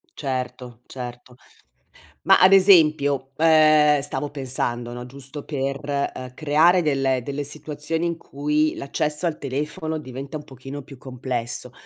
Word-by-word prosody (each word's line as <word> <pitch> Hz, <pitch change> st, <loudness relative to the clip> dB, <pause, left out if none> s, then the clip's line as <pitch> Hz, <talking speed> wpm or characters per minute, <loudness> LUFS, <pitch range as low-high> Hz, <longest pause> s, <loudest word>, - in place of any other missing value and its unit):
Certo, 125 Hz, -3 st, -5 dB
certo. 125 Hz, -1 st, -9 dB, 0.9 s
Ma -, -, +6 dB
ad 185 Hz, +1 st, +7 dB
esempio, 150 Hz, -8 st, +5 dB
ehm, 155 Hz, -2 st, +5 dB
stavo 145 Hz, +1 st, -4 dB
pensando, 125 Hz, -4 st, -3 dB
no, 120 Hz, 0 st, -7 dB
giusto 140 Hz, +3 st, -10 dB
per, 140 Hz, -2 st, -3 dB, 0.3 s
uhm, 130 Hz, -1 st, -8 dB
creare 160 Hz, +5 st, +4 dB
delle 135 Hz, -4 st, +1 dB
delle 140 Hz, +3 st, -4 dB
situazioni 155 Hz, +2 st, -4 dB
in 170 Hz, -1 st, -2 dB
cui 150 Hz, +1 st, -1 dB
l'accesso 150 Hz, +3 st, -2 dB
al 165 Hz, -2 st, -1 dB
telefono 150 Hz, +3 st, -3 dB
diventa 135 Hz, +2 st, -8 dB
un 150 Hz, -, -5 dB
pochino 135 Hz, +2 st, -9 dB
più 135 Hz, 0 st, -13 dB
complesso, 125 Hz, -1 st, -4 dB
140 Hz, 130 wpm, -23 LUFS, 130-155 Hz, 0.9 s, ad